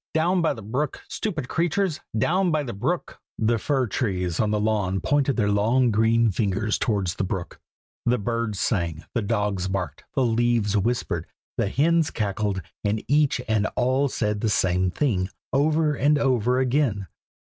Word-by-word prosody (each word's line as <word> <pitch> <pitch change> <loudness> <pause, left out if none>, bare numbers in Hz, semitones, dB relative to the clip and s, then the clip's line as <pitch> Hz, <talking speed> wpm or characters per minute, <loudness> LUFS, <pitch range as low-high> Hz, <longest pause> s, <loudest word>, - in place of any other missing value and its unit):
down 175 +3 +2
by 165 - +2
the 110 - -6
brook! 130 +7 -3
stupid 165 - -3
creatures! 175 +2 0 0.2
down 180 - +2
by 155 -2 +1
the 120 - -5
brook!" 100 - -3 0.2
the 115 +1 +1
fir 135 +2 +1
trees 90 -6 -2
on 110 - +2
the 105 0 +1
lawn 105 -3 0
pointed 140 +5 +1
their 105 -3 +2
long 115 +5 +3
green 115 +1 +3
fingers 105 +2 0
towards 100 -8 0
the - - -3
brook. 95 -2 -4 0.5
The 125 +1 +3
birds 115 -1 -2
sang, 85 -7 -1
the 120 - 0
dogs 105 -3 -1
barked, 90 -6 -3
the 135 - +2
leaves 115 -3 +1
whispered, 115 +4 -1 0.3
the 100 - 0
hens 165 +6 +2
cackled, 100 -2 -2 0.2
and 105 +1 -1
each 145 -3 +2
and 110 -1 +1
all 130 +3 +2
said 105 -5 -1
the 110 - +1
same 90 -2 +2
thing, 95 -4 0 0.2
over 150 +2 +2
and 145 +2 +3
over 125 -3 +2
again! 130 -6 +1
115 Hz, 165 wpm, -24 LUFS, 100-135 Hz, 0.5 s, long